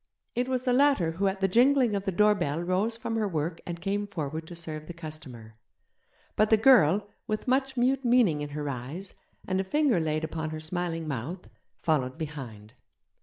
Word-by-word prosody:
It 245 +1 0
was 255 -1 -1
the 250 -2 +2
latter 265 - +3
who 190 +5 0
at 195 0 -2
the 195 - +4
jingling 245 +2 +4
of 200 0 -3
the 195 - 0
doorbell 180 -6 +2
rose 195 +6 0
from 225 0 -3
her 215 -2 +1
work 165 -1 -3
and 170 -1 -4
came 200 +3 -2
forward 160 -4 -4
to 175 - -8
serve 155 -2 -6
the 175 - -8
customer; 145 -9 -10 0.8
but 215 0 +3
the 220 - +6
girl, 210 - +5 0.2
with 215 +2 -3
much 265 +1 +1
mute 260 +2 +2
meaning 235 -11 +3
in 145 - -4
her 145 0 -4
eyes, 140 +9 -6 0.3
and 190 0 +1
a - - -3
finger 265 - +2
laid 155 -1 -1
upon 160 0 -3
her 155 0 -5
smiling 165 0 -3
mouth, 150 +7 -5 0.4
followed 140 -4 0
behind. 125 -9 -7
175 Hz, 190 wpm, -28 LUFS, 155-220 Hz, 0.8 s, the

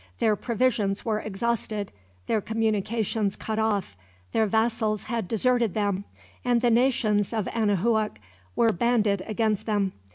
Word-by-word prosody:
Their 215 -1 +3
provisions 220 -4 0
were 215 -2 0
exhausted. 215 0 -2 0.3
Their 220 - +1
communications 220 -1 0
cut 220 0 -3
off. 205 - 0 0.4
Their 220 - +2
vassals 220 -1 +1
had 230 -6 -3
deserted 235 -1 +1
them, 200 -2 0 0.4
and 245 -1 +3
the 240 -1 +3
nations 225 -5 +2
of 215 -4 -1
Anahuac 215 0 +1 0.4
were 230 -1 +4
banded 215 -2 +2
against 215 -1 0
them. 205 -3 +1
220 Hz, 130 wpm, -26 LUFS, 205-230 Hz, 0.4 s, were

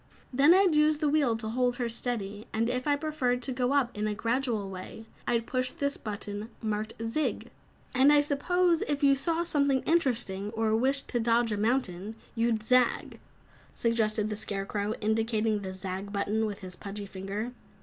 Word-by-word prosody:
Then 280 +5 +6
I'd 380 -3 +4
use 300 0 +4
the 305 0 0
wheel 285 -6 +2
to 220 -1 -5
hold 245 +1 +1
her 245 -2 -1
steady, 225 -3 -4
and 230 +2 +1
if 250 +2 -2
I 290 - +4
preferred 285 -5 -1
to 265 - -1
go 250 0 0
up 265 -4 +1
in 210 +1 -1
a 210 - -2
gradual 230 -2 -1
way, 190 +4 -8 0.2
I'd 230 -1 +1
push 255 0 -1
this 280 -3 -2
button 205 0 -5
marked 215 0 -2
'zig.'" 230 +7 -2 0.4
"And 265 +3 +5
I 295 - +6
suppose 335 +4 +1
if 290 -1 -1
you 280 -1 +6
saw 330 +5 +1
something 280 -5 +2
interesting, 240 - +1
or 220 -1 +1
wished 270 +4 +1
to 240 - 0
dodge 230 0 +2
a - - +1
mountain, 215 -3 -1 0.2
you'd 230 -2 0
'zag,'" 250 +1 +2 0.6
suggested 220 -2 +1
the - - -1
Scarecrow, 205 +1 -2
indicating 220 0 +1
the 190 -1 -5
"zag" 190 +1 -5
button 210 +2 0
with 205 -1 -6
his 185 -1 -8
pudgy 200 +2 -6
finger. 200 +4 -5
230 Hz, 180 wpm, -29 LUFS, 210-275 Hz, 0.6 s, Then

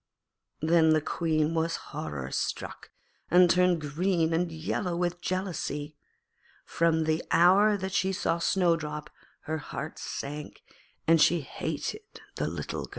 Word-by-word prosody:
Then 160 0 +4
the 155 - +3
Queen 155 0 0
was 165 0 0
horror 75 - -6
struck, - - -4 0.4
and 180 +1 +6
turned 180 -1 +3
green 165 +2 0
and 170 +1 0
yellow 170 +3 -2
with 175 0 -1
jealousy. 165 -5 -3 0.7
From 165 -1 +1
the 155 +1 0
hour 200 +5 +5
that 190 -1 -5
she 190 -1 +1
saw 180 -3 0
Snowdrop 165 -5 0 0.3
her 160 0 -3
heart - - -6
sank, 145 +2 -6 0.4
and 165 -1 +5
she 170 +2 +4
hated 150 - -4 0.3
the - - -1
little - - -4
girl. - - -18
165 Hz, 135 wpm, -28 LUFS, 155-180 Hz, 0.7 s, and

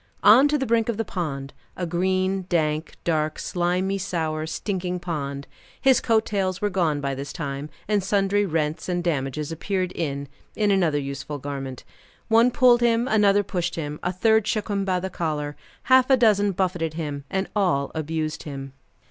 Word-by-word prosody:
On, 245 +7 +8
to 295 +1 +1
the 265 - -1
brink 230 -1 +1
of 230 - -1
the 225 - -1
pond 140 -8 -4 0.2
a 180 - -2
green, 185 +2 0
dank, 155 -2 0
dark, 155 -2 0
slimy 180 +2 -1
sour, 160 -4 -2
stinking 180 +1 -3
pond. 140 -5 -4 0.3
His 265 -2 +4
coat 225 -2 +2
tails 190 -3 -1
were 205 +1 0
gone 165 -6 +1
by 140 -1 -1
this 140 +1 -5
time, 140 -2 -5 0.2
and 205 -2 +1
sundry 200 +1 +2
rents 160 -3 -1
and 175 -1 -1
damages 150 -2 -2
appeared 185 +2 -2
in 140 -5 -3 0.3
in 210 -2 +2
another 175 -6 +2
useful 140 +1 -4
garment. 135 -2 -6 0.5
One 230 +2 +5
pulled 245 -1 +5
him, 235 +1 +3
another 205 -3 +4
pushed 180 -2 -2
him, 150 -2 -4
a 180 - -1
third 220 +3 +3
shook 215 0 -1
him 200 -1 0
by 185 -1 +1
the 190 +1 -4
collar, 150 -4 -2 0.3
half 260 +1 +5
a 265 - +6
dozen 205 -4 +3
buffeted 175 -4 -1
him, 145 -4 -4
and 190 0 -1
all 175 -9 +1
abused 155 0 -3
him. 135 -2 -7
180 Hz, 175 wpm, -24 LUFS, 150-205 Hz, 0.5 s, On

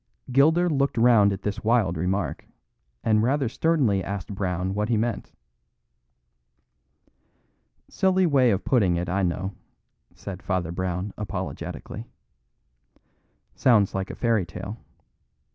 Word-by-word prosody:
Gilder 160 +7 +4
looked 140 -5 0
round 115 -4 +5
at 95 0 -5
this 105 +2 -3
wild 110 -6 +2
remark, 90 -1 -2 0.6
and 110 -1 +3
rather 135 +3 +1
sternly 120 - +1
asked 100 +1 -5
Brown 95 -1 -2
what 105 +2 -1
he 115 - +2
meant. 115 +2 -2 2.6
"Silly 190 -1 +2
way 135 -6 +4
of 100 -4 0
putting 100 -9 +3
it, 85 +1 -2
I 95 +3 0
know," 95 +2 -2 0.6
said 95 -2 -8
Father 90 -3 -2
Brown 90 +2 -3
apologetically. 105 - -6 1.5
"Sounds 110 -6 +3
like 95 0 -3
a - - -6
fairy 115 -4 +1
tale. 95 +5 -7
105 Hz, 120 wpm, -25 LUFS, 95-120 Hz, 2.6 s, round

